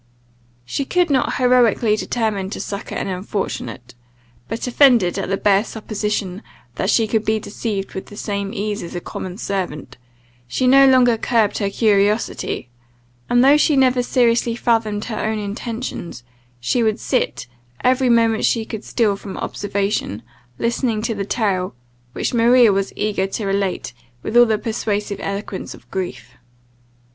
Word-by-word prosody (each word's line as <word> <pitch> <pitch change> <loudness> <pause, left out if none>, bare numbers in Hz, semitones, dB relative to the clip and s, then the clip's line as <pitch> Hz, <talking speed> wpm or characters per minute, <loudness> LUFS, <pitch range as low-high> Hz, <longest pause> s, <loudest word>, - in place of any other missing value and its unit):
She 200 - -2
could 350 +3 +1
not 260 -3 +1
heroically 245 -3 +3
determine 215 -4 -2
to - - -6
succour 200 -1 -5
an - - -3
unfortunate; 180 - -4 0.5
but, 225 - -4
offended 245 -7 +4
at - - -3
the 195 - 0
bare 200 0 +3
supposition 210 -3 -3 0.3
that 190 - -2
she 225 - +3
could 220 0 0
be 220 0 +1
deceived 205 -2 -4
with 190 - -6
the 205 - -12
same 200 -2 -3
ease 210 0 -3
as 170 - -7
a - - -2
common 180 +1 -7
servant, 175 - -4 0.5
she 125 - -1
no 270 +2 +7
longer 250 -3 +5
curbed 220 -4 +1
her 200 -2 0
curiosity; 205 - +1 0.6
and, 245 +1 +4
though 280 +2 +7
she 300 0 +3
never 255 -2 +4
seriously 235 -1 +2
fathomed 220 -3 0
her 220 -3 -4
own 220 0 -1
intentions, 210 - -5 0.4
she 125 - 0
would 220 0 +1
sit, 255 - -1 0.4
every 255 0 +3
moment 230 -2 +3
she 225 -2 +1
could 220 -1 -6
steal 215 -4 +1
from 195 -1 -8
observation, 200 - -2 0.3
listening 230 -2 -1
to 230 - -1
the 200 -2 -3
tale, 190 - -1 0.4
which - - -2
Maria 235 -1 +5
was 195 0 -1
eager 205 -2 0
to 205 +2 -4
relate 195 -10 -1 0.3
with 220 - -4
all 240 0 +7
the 220 -1 +2
persuasive 210 -2 -2
eloquence 200 -1 -5
of - - -19
grief. 130 -11 -5
215 Hz, 155 wpm, -20 LUFS, 195-235 Hz, 0.6 s, no